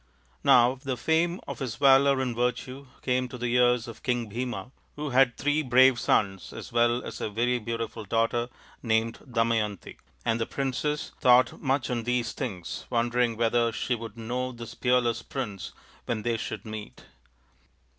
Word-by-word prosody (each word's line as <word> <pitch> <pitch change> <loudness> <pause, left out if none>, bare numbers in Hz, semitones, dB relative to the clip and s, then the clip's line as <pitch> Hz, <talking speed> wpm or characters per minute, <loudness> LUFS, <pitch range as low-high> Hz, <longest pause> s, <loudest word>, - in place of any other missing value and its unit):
Now 125 +2 +5
the 130 -3 -2
fame 165 - +1
of - - -6
his 125 -5 -3
valour 135 +1 +5
and 125 -3 -2
virtue 125 +3 -2 0.2
came 125 0 +1
to 125 - -8
the 120 0 -2
ears 125 -1 +3
of 115 - -10
King 120 -3 -1
Bhima, 125 +2 -4 0.2
who 150 -1 -4
had 125 -1 +4
three 145 +3 +1
brave 130 -2 +5
sons 95 -3 0
as - - -9
well 120 +1 +2
as - - -7
a - - -2
very 120 +4 0
beautiful 115 0 -4
daughter 115 +3 0 0.3
named 115 0 0
Damayanti; 115 -4 -1 0.3
and 115 -1 +1
the 115 - -1
princess 140 +2 -2
thought 125 0 +4
much 130 -1 0
on 120 -1 -1
these 125 0 -1
things, 95 -11 -5
wondering 120 -1 +1
whether 115 0 +2
she 125 - -2
would 115 -1 -6
know 125 +3 -3
this 115 -2 -9
peerless 120 -2 +1
prince 105 -8 -5 0.4
when 110 -3 -2
they 120 0 0
should - - -5
meet. 110 -1 -8
120 Hz, 165 wpm, -27 LUFS, 115-130 Hz, 0.4 s, Now